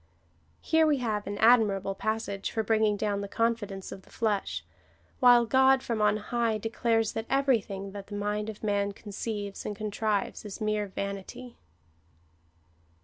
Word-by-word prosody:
Here 320 -1 +3
we 295 -2 +3
have 215 -5 -2
an 205 0 -4
admirable 210 -4 +4
passage 200 -1 -2
for 220 - -1
bringing 215 -1 +2
down 200 -1 -1
the 200 - -4
confidence 210 -3 -2
of 190 - -8
the - - -22
flesh, 200 - -2 0.5
while 245 -1 +7
God 265 +2 +4
from 230 -3 -2
on 210 0 +3
high 225 +1 -1
declares 225 0 0
that 225 +1 -5
everything 220 -8 0
that 200 0 -8
the 205 - -7
mind 210 +1 -2
of 215 0 -9
man 200 -1 0
conceives 205 0 -5
and 210 - -4
contrives 210 -1 -2
is 210 -2 -7
mere 215 -1 0
vanity. 200 +6 -6
215 Hz, 150 wpm, -28 LUFS, 200-230 Hz, 0.5 s, while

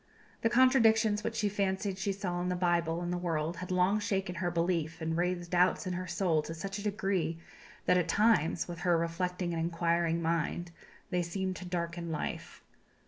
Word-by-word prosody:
The 225 - +3
contradictions 225 -4 +4
which 230 - -2
she 210 -2 +1
fancied 195 -1 -1
she 195 +1 0
saw 185 -3 -3
in 180 - -1
the 180 - 0
Bible 175 -1 +1
and 175 0 -2
the 175 - -1
world 165 -1 -1
had 180 0 -6
long 185 +3 +3
shaken 195 -4 -1
her 175 0 -1
belief, 170 -1 -1
and 160 0 -2
raised 175 0 -1
doubts 180 +2 +3
in 185 - -2
her 180 +1 -4
soul 170 -6 +1
to 160 +2 -7
such 195 +5 -5
a - - -6
degree 195 -5 -1 0.5
that, 180 - +4
at 175 - 0
times, 205 -7 +3
with 175 -1 -6
her 175 -2 +3
reflecting 175 +1 -2
and 165 - -1
inquiring 170 0 +1
mind, 170 +1 -1 0.4
they 180 -1 +1
seemed 185 +2 -2
to 180 - -8
darken 170 -1 -3
life." 155 - -5
180 Hz, 195 wpm, -31 LUFS, 170-195 Hz, 0.5 s, contradictions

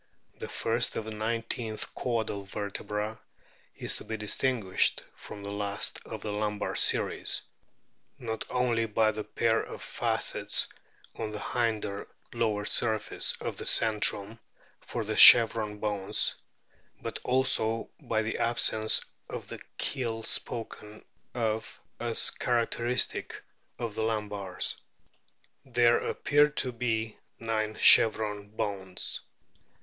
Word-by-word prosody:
The - - -6
first - - 0
of 110 - -3
the 110 - -6
nineteen 115 0 -3 0.2
caudal 110 -5 -2
vertebra 105 +2 -5 0.6
is - - +2
to - - -8
be 110 - -5
distinguished 105 -2 0
from 100 - -10
the 100 - -6
last 100 0 -1
of 110 -2 -7
the 105 - -3
lumbar 105 0 -2
series - - +2 0.7
not 115 -4 -4
only 120 -2 0
by 110 0 +2
the 110 0 -5
pair 115 +1 +1
of - - -9
facets - - 0 0.5
on 110 - -3
the 105 - -6
hinder 110 -3 -2 0.3
lower 105 -3 -1
surface 110 -1 +1
of - - -5
the - - -6
centrum 110 -1 +2 0.4
for 115 -2 -5
the 110 +1 -3
chevron 110 -3 +8
bones, 105 -1 +1 0.7
but - - -5
also 115 -3 +1
by 110 -1 -1
the 110 - -3
absence 110 -2 +3 0.2
of - - -7
the - - -7 0.2
keel 115 -5 -2
spoken 110 -3 -4 0.3
of 110 -2 -2 0.2
as 115 -1 +2
characteristic 120 0 0 0.3
of 115 -3 -4
the 110 - -3
lumbars. 105 -4 -2 0.9
There 120 -2 +3
appear 145 +1 +2
to 135 -3 -1
be 115 -2 -2 0.2
nine 110 -1 -2
chevron 105 -2 +5
bones. 95 -3 -4
110 Hz, 120 wpm, -29 LUFS, 105-115 Hz, 0.9 s, chevron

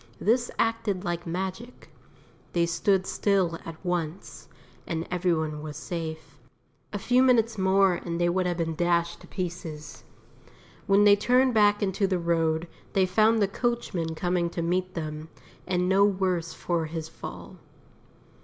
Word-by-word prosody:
This 240 +3 +2
acted 225 -4 0
like 175 -2 -3
magic; 190 +8 -5 0.6
they 170 -1 +3
stood 185 +3 +1
still 190 -6 +1
at 165 - -7
once, 175 0 -4 0.4
and 165 -1 -3
every 180 0 +1
one 155 -2 -1
was 150 -1 -7
safe. 160 -3 -6 0.5
A 205 - -3
few 245 +5 +3
minutes 235 -3 +3
more 190 -1 +3
and 170 -1 -4
they 175 - +2
would 180 +1 +1
have 175 -1 -1
been 165 -1 -1
dashed 170 0 0
to - - -14
pieces. 170 -5 -6 0.8
When 200 0 +5
they 205 -1 +7
turned 250 +5 +3
back 205 -1 +4
into 195 0 +1
the 185 -1 0
road 165 -1 0 0.3
they 190 -1 +3
found 215 +4 +3
the - - +3
coachman 200 -7 -2
coming 175 0 0
to 170 0 -3
meet 185 +2 -1
them, 155 -1 -5 0.4
and 180 -1 +1
no 190 +2 +4
worse 185 -4 +1
for 170 -2 -2
his 160 0 -5
fall. - - -9
180 Hz, 155 wpm, -27 LUFS, 165-200 Hz, 0.8 s, they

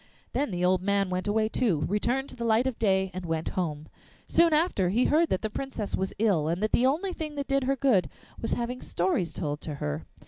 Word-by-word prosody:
Then 290 - 0
the 180 -2 -1
old 185 0 +3
man 200 -1 +1
went 185 +2 -2
away 215 +1 +2
too, 215 - +1
returned 245 +7 0
to - - -9
the 235 - -5
light 230 +2 +3
of 260 -3 -2
day, 190 -3 +2
and 185 0 -5
went 165 -1 -2
home. 155 -4 -3 0.4
Soon 335 0 +4
after 300 - +2
he 230 +7 +2
heard 320 +2 +3
that 190 - -1
the - - +1
Princess 235 -5 -3
was 190 0 -2
ill, 195 -8 +2
and 170 +2 0
that 215 - +1
the 250 - +4
only 355 +8 0
thing 305 -3 -5
that 280 -1 -3
did 275 -1 +1
her 275 +1 +2
good 250 -9 +2 0.3
was 225 - -1
having 245 +1 -3
stories 180 -1 0
told 145 -1 -4
to 150 - -5
her. 75 - -4
210 Hz, 235 wpm, -28 LUFS, 180-265 Hz, 0.4 s, Soon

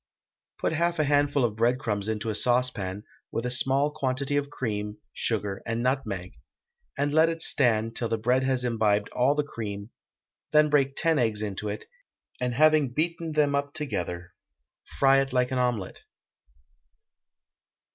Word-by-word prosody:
Put - - -1
half 170 +1 0
a 155 - +2
handful 145 -2 +2
of 110 -3 -2
breadcrumbs 115 -3 0
into 110 0 -2
a - - -3
saucepan, 110 -5 0 0.3
with 115 - -3
a 125 - -1
small 135 +3 +2
quantity 135 0 -2
of 145 0 0
cream, 105 -6 -4 0.2
sugar, 105 -4 -2
and 115 +1 -2
nutmeg, 100 - -2 0.6
and 145 +1 0
let 160 +1 +5
it 165 0 +1
stand 115 -4 +2
till 115 - -1
the 115 - 0
bread 125 +4 +2
has 130 -1 0
imbibed 110 -4 +1
all 130 +4 +2
the 150 - +1
cream; 105 -5 -6 0.6
then 150 0 +5
break 140 -2 +2
ten 165 -3 +2
eggs 110 -3 0
into 105 0 -4
it, 105 - -5 0.5
and 125 -1 -1
having 155 -1 +4
beaten 165 +3 -2
them 150 -2 +2
up 140 0 -2
together, 90 - -4 0.6
fry 135 0 +5
it 135 -1 -4
like 125 0 +1
an 130 - 0
omelet. 120 -7 -1
125 Hz, 155 wpm, -27 LUFS, 110-145 Hz, 0.6 s, let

